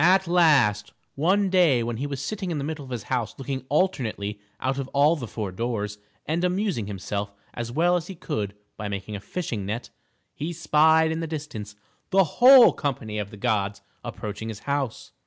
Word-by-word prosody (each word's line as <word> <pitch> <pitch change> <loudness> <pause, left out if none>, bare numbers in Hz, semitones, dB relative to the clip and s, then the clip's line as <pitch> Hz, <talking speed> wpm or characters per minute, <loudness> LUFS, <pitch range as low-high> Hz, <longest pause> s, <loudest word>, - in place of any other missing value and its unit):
At 190 +1 +5
last, 135 -12 +3 0.2
one 190 +6 +2
day 165 -10 +4
when 115 0 -3
he 140 +4 -2
was 140 -2 -4
sitting 200 -4 -3
in 165 - -2
the 140 - -2
middle 150 0 -4
of 130 - -11
his 120 -3 -4
house 120 -5 -2
looking 135 -1 -4
alternately 120 - 0 0.2
out 135 +2 -1
of 135 - -3
all 145 +4 +5
the 130 -7 -6
four 105 -3 -4
doors 105 0 -3 0.3
and 165 +4 -1
amusing 180 - 0
himself 100 0 -4 0.2
as 120 0 -4
well 170 +6 +3
as 175 -1 -2
he 190 - -7
could 105 - -3 0.2
by 105 - -4
making 100 +1 -5
a - - -4
fishing 115 - -4
net, 110 +5 -4 0.4
he 160 +4 -4
spied 160 0 +4
in 160 - -2
the 165 - -3
distance 145 -10 -6 0.3
the 195 0 +5
whole 245 - +8
company 110 -7 -3
of 100 -1 -4
the 105 - -11
gods 100 -3 0 0.2
approaching 105 +1 -5
his 110 -2 -7
house. 140 -4 -3
135 Hz, 195 wpm, -25 LUFS, 105-165 Hz, 0.4 s, whole